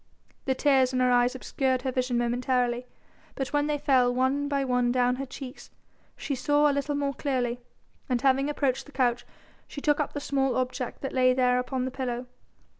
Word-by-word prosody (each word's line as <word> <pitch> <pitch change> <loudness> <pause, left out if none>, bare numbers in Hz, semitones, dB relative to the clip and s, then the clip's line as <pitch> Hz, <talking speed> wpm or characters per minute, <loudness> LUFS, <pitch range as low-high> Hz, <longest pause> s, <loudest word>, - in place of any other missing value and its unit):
The 265 - +1
tears 265 -2 +3
in 255 - +1
her 250 0 +3
eyes 245 +1 +3
obscured 260 0 -1
her 260 - -1
vision 255 -1 0
momentarily, 245 0 0 0.5
but 270 -2 -3
when 290 0 +2
they 300 -1 0
fell 260 -3 +3
one 260 +3 +1
by 280 -1 0
one 250 -1 +1
down 250 0 +2
her 275 0 -4
cheeks, 260 0 -9 0.5
she 285 - -3
saw 290 +2 +2
a 290 - +2
little 280 +1 -1
more 280 -1 -1
clearly, 250 -4 -1 0.5
and 250 -1 +1
having 270 +2 +2
approached 275 -2 -1
the - - -13
couch 245 -3 0 0.4
she - - -7
took 295 0 +1
up 295 - -1
the 290 - -3
small 270 -2 0
object 255 -1 -3
that 270 - -4
lay 255 -1 +4
there 250 -1 +3
upon 250 0 -2
the 260 - -3
pillow. 250 -2 -3
260 Hz, 195 wpm, -27 LUFS, 250-280 Hz, 0.5 s, lay